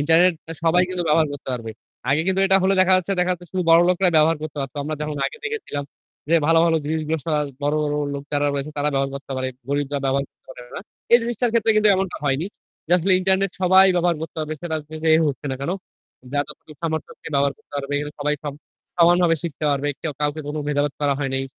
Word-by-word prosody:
Internet 165 +4 +4 0.3
সবাই 175 +2 +4
কিন্তু 185 -1 -2
ব্যবহার 155 +1 +4
করতে 140 -1 -8
পারবে। 115 -3 -4 0.4
আগে 145 +3 +3
কিন্তু 190 0 +1
এটা 195 0 +5
হলে 190 +1 +3
দেখা 185 0 +4
যাচ্ছে 185 +1 -1
দেখা 180 0 +1
হচ্ছে 175 0 -8
শুধু 185 -1 -1
বড়লোকরাই 175 +2 +4
ব্যবহার 160 +1 +4
করতে 155 -1 -6
পারত। 135 -2 -5
আমরা 155 +2 -3
যেমন 150 -1 -3
আগে - - -8
দেখেছিলাম 425 - -4 0.4
যে, 170 - +3
ভালো, 165 +1 +5
ভালো 165 -1 +3
জিনিসগুলো 155 +1 -1
সব 165 - -1 0.3
বড়, 145 +1 +1
বড় 145 -1 -1 0.2
লোক 140 - -5
যারা 145 0 +1
রয়েছে 140 +2 -3
তারা 145 - +1
ব্যবহার 135 0 0
করতে 140 0 -7
পারে। 130 0 -1 0.2
গরিবরা 145 0 -1
ব্যবহার 135 +1 +1
করতে - - -52
পারে 125 - -10
না। - - -4 0.3
এই 235 - +9
জিনিসটার 240 0 -1
ক্ষেত্রে 225 -1 +3
কিন্তু 215 0 +5
এমনটা 190 -1 -2
হয়নি। 140 +4 0 0.4
যে 170 - -1
আসলে 185 +3 +1
ইন্টারনেট 190 +1 +2
সবাই 190 +1 +7
ব্যবহার 175 -1 +2
করতে 160 - -7
হবে। 155 - -4
সেটা 165 -2 -2 0.3
যে 160 - +4
হোক 145 -3 0
না 130 - -2
কেন; 140 - -2 0.6
যার 145 0 +1
যতটুকু 150 +1 -10
সামর্থ্য 160 -1 -2
আছে - - -18
ব্যবহার 140 0 +2
করতে 220 - -31
পারবে। 140 0 -3 0.3
সবাই 150 +1 +1 0.6
সমানভাবে 175 -1 +5
শিখতে 160 -3 -5
পারবে। 140 0 0
কেউ 155 - -3
কাউকে 150 +1 -1
কোন 150 - -4
ভেদাভেদ 145 -1 0
করা 145 -1 +2
হয় 140 -2 -2
নাই। 135 0 -1
160 Hz, 215 wpm, -22 LUFS, 145-180 Hz, 0.6 s, এই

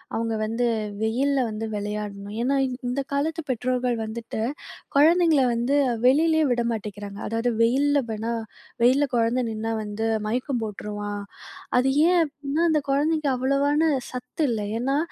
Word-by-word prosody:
அவங்க 225 0 -1
வந்து 230 +3 0 0.4
வெயில்ல 265 +5 +1
வந்து 220 +1 -4
விளையாடணும். 205 0 -5
ஏன்னா, 265 +3 +1 0.3
இந்த 265 +3 -1
காலத்து 315 +4 0
பெற்றோர்கள் 250 0 0
வந்துட்டு, 220 0 -5 0.5
குழந்தைங்கள 320 -1 +5
வந்து 240 +4 0 0.3
வெளியிலயே 315 +4 +4
விட 240 0 +1
மாட்டேங்கிறாங்க. 205 -2 -6
அதாவது 230 +2 0
வெயில்ல 280 +5 +3
வேணாம், 225 +1 -2 0.4
வெயில்ல 270 +4 +4
கொழந்த 235 +2 +2
நின்னா 225 +1 -3
வந்து, 210 +2 -3 0.2
மயக்கம் 250 +2 -1
போட்ருவான். 205 -1 -5 0.6
அது 265 +1 +2 0.2
ஏன் 360 0 +4
அப்டின்னா, 290 +1 -2
அந்த 305 -2 +2
கொழந்தைக்கு 295 +1 +1
அவ்வளவான 285 +4 +2 0.2
சத்து 250 +5 -3
இல்ல. 220 - -1 0.2
ஏன்னா, 270 +3 0
245 Hz, 130 wpm, -25 LUFS, 220-280 Hz, 0.6 s, குழந்தைங்கள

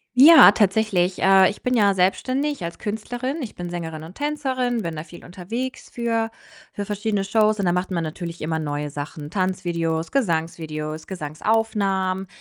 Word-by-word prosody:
Ja, 295 -4 +10
tatsächlich. 195 -3 +1
Äh, 190 0 +6
ich 205 - -8
bin 250 - 0
ja 200 -4 +3
selbstständig 260 +9 0
als 170 0 -5
Künstlerin. 245 +7 -4
Ich 240 - -6
bin 175 -1 -6
Sängerin 160 -3 -5
und 165 - -10
Tänzerin, 260 -4 -1
bin 165 -2 -4
da 155 - -5
viel 170 0 -14
unterwegs 225 +9 -6
für 230 -1 -1 0.4
für 205 - -5
verschiedene 205 0 -1
Shows, 215 +1 +2
und 200 - -1
da 175 - +3
macht 180 +1 -1
man 170 -3 -1
natürlich 170 +2 -6
immer 160 +1 -1
neue 145 -1 -3
Sachen: 145 +1 -7
Tanzvideos, 175 -4 -1
Gesangsvideos, 160 - -2
Gesangsaufnahmen. 190 +2 -1
190 Hz, 160 wpm, -23 LUFS, 165-225 Hz, 0.4 s, Ja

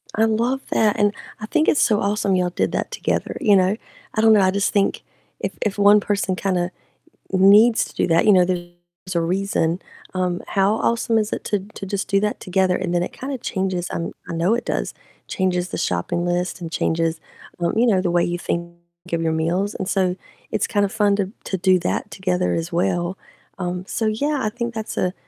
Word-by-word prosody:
I 220 - +4
love 235 +4 +1
that, 215 -2 +2
and 205 0 +3 0.3
I 215 - -5
think 310 +7 +1
it's 295 - +3
so 210 -2 +3
awesome 200 -1 +1
y'all 180 -1 +1
did - - -1
that - - -2
together, - - -2
you 205 -2 +4
know? 190 +2 +3 0.4
I 215 - +1
don't 220 0 +6
know, 210 - +5
I 185 0 +4
just 200 +1 0
think 200 -1 +1 0.4
if - - -3
if 210 -2 -1
one 205 +1 +6
person 200 -2 -1
kinda 180 -2 -1 0.6
needs 205 +5 +6
to - - -14
do - - +1
that, 165 0 +3
you 210 - +7
know, 180 -2 +5
there's 175 0 -6
a 170 - +2
reason, 180 -1 0 0.3
um, 180 -1 -1
how 200 +1 +2
awesome 230 0 +1
is 215 0 0
it - - -4
to 205 - 0
to 195 - -7
just 195 0 -3
do 200 - +2
that 210 +1 -1
together, 185 0 +1
and 180 -2 -2
then 175 - +2
it - - -4
kinda 270 0 -5
changes, 190 -4 -2
um, 170 - -3 0.2
I - - -3
know 170 +6 +2
it 235 - -2
does, - - -2 0.3
changes 180 -1 -1
the - - -4
shopping 130 - -1
list 175 +1 -1
and 165 -1 -6
changes, 165 -1 0 0.4
um, 170 - 0
you 235 +2 +3
know, 190 -4 +3
the 180 - 0
way 175 0 +3
you 175 0 -1
think 170 0 -3 0.4
of 170 -1 0
your 160 - +1
meals. 175 +6 0
And 190 - -4
so 185 -3 +1 0.4
it's - - 0
kind 205 -2 +2
of 195 - -4
fun 205 -2 +2
to 200 -1 -2
to 190 - -2
do 185 0 +3
that 175 - -2
together 180 -1 0
as 165 +1 -2
well. 175 +1 0 0.4
Um, 180 -1 -3
so 225 - -2
yeah, 280 +7 0
I 215 - +1
think 235 +1 -4
that's 220 -1 -4
a 180 0 0
190 Hz, 220 wpm, -22 LUFS, 175-210 Hz, 0.6 s, you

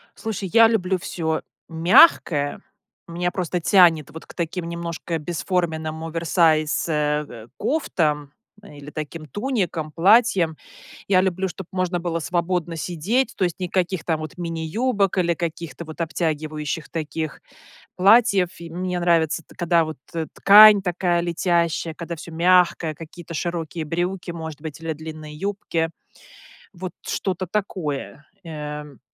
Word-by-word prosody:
Слушай, 205 -4 -4
я 230 -1 +8
люблю 190 -4 +1
всё 160 -2 -2 0.3
мягкое. 165 - +4 0.5
Меня 175 +1 -2
просто 180 -1 -2
тянет 165 -5 +4
вот 160 - -10
к - - -14
таким 170 0 -3
немножко 170 -1 -4
бесформенным 160 -1 -2
оверсайз, 165 -1 +2
э, 150 -7 -2
кофтам 150 - -1 0.3
или 145 -5 -11
таким 155 +1 -6
туникам, 180 - -2
платьям. 190 -3 +4 0.5
Я 185 -2 +4
люблю, 190 0 0
чтоб 185 0 -8
можно 185 -1 -1
было 170 -1 -2
свободно 175 0 -1
сидеть, 185 - -1
то 185 - +1
есть 175 - -3
никаких 180 -1 -1
там 160 -2 -1
вот 155 +3 -7
мини-юбок 185 +5 -1
или 170 -1 +2
каких-то 170 -1 -5
вот 160 +2 -7
обтягивающих 155 -2 -3
таких 155 -1 -4 0.6
платьев. 200 -1 +5
И 170 -1 -8
мне 180 0 -3
нравится 165 -2 +2
т - - -19
когда 170 -1 +2
вот 155 -2 -6 0.4
ткань 210 0 +8
такая 175 -1 0
летящая, 170 -1 0
когда 170 +1 -6
всё 165 +1 -10
мягкое, 170 -2 +3
какие-то 165 +1 -10
широкие 165 -1 -3
брюки 175 +3 -2
может 160 -3 -7
быть, 155 -1 -7
или 165 -1 -3
длинные 155 -1 -9
юбки, 170 -2 -2 0.8
вот 185 0 -6
что-то 185 -1 -2
такое, 160 -7 -4 0.2
эм. 150 -3 -7
170 Hz, 130 wpm, -23 LUFS, 155-185 Hz, 0.8 s, я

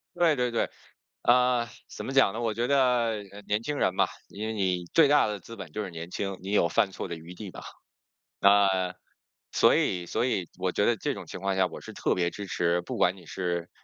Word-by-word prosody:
对 165 -3 +4
对 125 -1 +1
对。 115 - 0 0.5
嗯， 125 -1 +4 0.2
怎 - - -7
么 135 - -4
讲 135 -7 +5
呢？ 115 - -4
我 115 -2 0
觉 120 +3 -1
得， 140 - +3 0.5
呃， 100 +1 -10
年 105 +2 +1
轻 150 +3 -2
人 95 - +1
吧， - - +4 0.2
因 110 +2 -5
为 110 - -2
你 95 -4 0
最 160 -3 +7
大 145 -5 +5
的 105 -1 -3
资 115 +6 -10
本 95 -6 -8
就 105 - -2
是 95 - -5
年 85 0 -7
轻， 95 -2 -3
你 95 +2 -5
有 95 -5 +3
犯 95 +4 +2
错 - - -5
的 85 - -3
余 85 +2 -10
地 100 +1 -8
吧。 - - -9 0.8
嗯， 95 -2 +4 0.6
所 - - +5
以 90 -2 0
所 120 - 0
以， 95 -9 -1
我 90 0 -1
觉 100 - +1
得 120 - +3
这 - - -1
种 - - -8
情 - - -8
况 100 0 0
下， 95 -1 +4
我 - - -9
是 - - -9
特 - - 0
别 90 -1 0
支 100 +1 -7
持 85 0 +1
不 85 - -6
管 90 +2 +2
你 90 - -15
是， 90 -2 -3
100 Hz, 255 characters per minute, -28 LUFS, 90-115 Hz, 0.8 s, 最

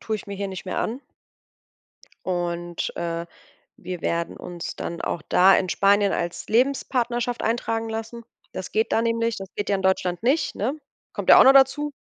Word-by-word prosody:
tue 220 -1 -2
ich - - -11
mir 200 - -6
hier 200 0 -3
nicht 190 0 -7
mehr - - -3
an 240 +5 -2 1.3
und, 175 -1 -3
äh, 170 0 -3 0.6
wir 180 -1 -6
werden 170 0 -2
uns 175 -1 -7
dann 170 - -5
auch 160 - -3
da 190 +2 +6
in 185 - -1
Spanien 200 0 +3
als 170 0 -3
Lebenspartnerschaft 245 -1 0
eintragen 225 -1 -1
lassen. 225 +1 -6 0.3
Das 185 - -7
geht 220 +1 0
da - - +3
nämlich, 230 0 0
das 195 -1 -7
geht 205 - -2
ja 200 - +3
in - - -4
Deutschland 185 -1 0
nicht, 275 +7 +1
ne? 250 +8 -1 0.4
Kommt - - 0
ja - - +10
auch - - +8
noch 270 +1 +7
dazu. 275 +2 +4
205 Hz, 185 wpm, -24 LUFS, 180-235 Hz, 1.3 s, ja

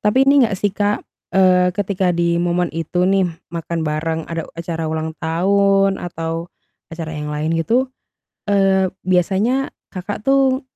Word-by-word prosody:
Tapi 210 +4 +2
ini 275 -1 +5
nggak 210 -4 -1
sih 205 +1 0
Kak, 205 +1 0 0.3
eee, 185 -1 +5
ketika 195 -2 0
di 170 0 +1
momen 175 0 0
itu 165 +2 -1
nih 190 -1 +3 0.2
makan 165 -1 -3
bareng 160 +1 -1
ada 165 -1 -4
acara 165 -1 -3
ulang 160 0 -2
tahun 195 +3 +2
atau 165 0 -4 0.4
acara 165 -1 -6
yang 150 0 -4
lain 150 +2 -1
gitu, 240 +10 +1 0.6
eee, 195 -2 +3
biasanya 195 +9 +1 0.2
Kakak 200 +2 -5
tuh 270 +1 +3
180 Hz, 145 wpm, -19 LUFS, 165-200 Hz, 0.6 s, ini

